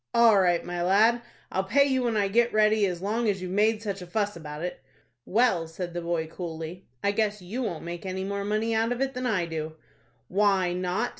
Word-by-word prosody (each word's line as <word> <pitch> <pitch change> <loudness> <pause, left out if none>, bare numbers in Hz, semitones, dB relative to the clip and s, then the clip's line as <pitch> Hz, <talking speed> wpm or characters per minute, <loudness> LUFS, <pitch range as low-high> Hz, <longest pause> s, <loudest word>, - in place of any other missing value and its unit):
"All 230 -4 +6
right, 175 -2 +2
my 175 0 -3
lad, 215 +6 +4 0.3
I'll 190 - 0
pay 280 +9 +4
you 265 -2 +1
when 235 -3 0
I 200 -1 +2
get 235 +4 +2
ready 215 -1 +3
as 180 -1 -4
long 220 +3 0
as 195 -2 0
you've 180 0 -5
made 215 +3 +2
such 200 -3 -3
a 180 - -8
fuss 205 +2 -1
about 150 -1 -7
it." 180 - -5 0.4
"Well," 200 -6 +2
said 175 +1 -6
the 175 - -3
boy, 170 -1 -1
coolly, 165 +1 -7 0.2
"I 200 - +3
guess 210 0 0
you 200 +8 -5
won't 190 -10 -3
make 170 0 -6
any 190 0 -3
more 200 +1 -3
out 220 +2 0
of 245 - -2
it 270 0 0
than 250 0 -2
I 195 -7 +1
do." 160 -1 -5 0.5
"Why 195 -2 +2
not?" 185 +6 -1
195 Hz, 220 wpm, -27 LUFS, 175-220 Hz, 0.5 s, All